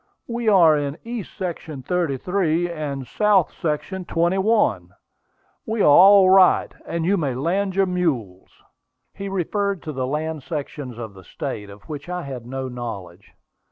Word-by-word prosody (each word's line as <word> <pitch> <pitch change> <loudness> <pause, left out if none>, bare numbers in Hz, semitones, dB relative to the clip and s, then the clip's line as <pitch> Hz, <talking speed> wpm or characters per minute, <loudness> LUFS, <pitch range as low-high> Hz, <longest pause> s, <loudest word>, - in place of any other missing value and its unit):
We 235 -1 -1
are 170 -6 +6
in 145 0 -2
east 230 -4 -7
section 165 -7 -5
33, 175 +2 0
and 145 -5 -4
south 200 - +2
section 170 +4 -2
21. 175 - +1 0.8
We 220 -1 -1
are - - +4
all 190 +6 +8
right, 185 -1 +5
and 170 -1 -2
you 200 +3 +2
may 140 -7 -1
land 185 +8 -1
your 195 0 +3
mules." 140 - -2 0.6
He 200 0 -6
referred 195 +1 -1
to 155 - -5
the 130 -3 -3
land 155 +2 -3
sections 140 -4 -6
of 110 -3 -7
the 95 -1 -14
state, 105 +3 -6
of 100 +1 -13
which 150 +1 -8
I 180 -1 -3
had 125 -4 -7
no 130 +1 -4
knowledge. 100 -8 -8
160 Hz, 155 wpm, -22 LUFS, 130-190 Hz, 0.8 s, all